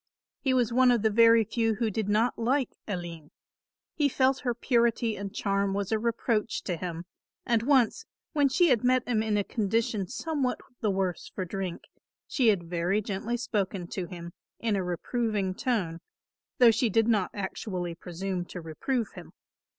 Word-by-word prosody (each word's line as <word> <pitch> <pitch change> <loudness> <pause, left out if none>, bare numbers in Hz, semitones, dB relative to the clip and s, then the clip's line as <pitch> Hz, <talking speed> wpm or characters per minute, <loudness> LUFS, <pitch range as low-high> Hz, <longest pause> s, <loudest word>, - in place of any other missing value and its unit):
He 265 - 0
was 245 -2 +2
one 255 +1 +5
of 240 -3 +3
the 220 - +3
very 230 +1 +6
few 225 +1 0
who 225 -1 0
did 210 0 -2
not 225 +4 +3
like 255 +3 +1
Aline. 170 -6 -5 0.6
He 290 -2 +2
felt 265 0 +2
her 245 -3 -1
purity 235 -2 +1
and 200 0 -5
charm 200 -1 0
was 200 0 -2
a 220 - +2
reproach 230 -1 -1
to 180 - -2
him, 170 0 -5 0.4
and 235 -2 +2
once, 255 -2 +2 0.3
when 285 -2 +3
she 345 +5 +4
had 245 -4 +3
met 255 0 +2
him 225 -3 +1
in 215 -1 0
a 205 - +2
condition 215 -2 -1
somewhat 275 - -2 0.2
the 215 - 0
worse 190 -3 -2
for 185 - -2
drink, 185 -1 -4 0.4
she 265 -8 +1
had 190 -6 +3
very 175 +4 0
gently 215 +3 -3
spoken 200 -6 -2
to 185 -3 -4
him 170 -2 -8 0.3
in 225 -3 0
a 195 - 0
reproving 200 +2 -1
tone, 185 -8 -1 0.6
though 245 -4 +7
she 230 +1 +1
did 225 +2 +3
not 210 -5 +2
actually 185 -3 -4
presume 180 +2 -4
to 180 - -8
reprove 210 - -2
him. - - -11
215 Hz, 175 wpm, -28 LUFS, 190-240 Hz, 0.6 s, though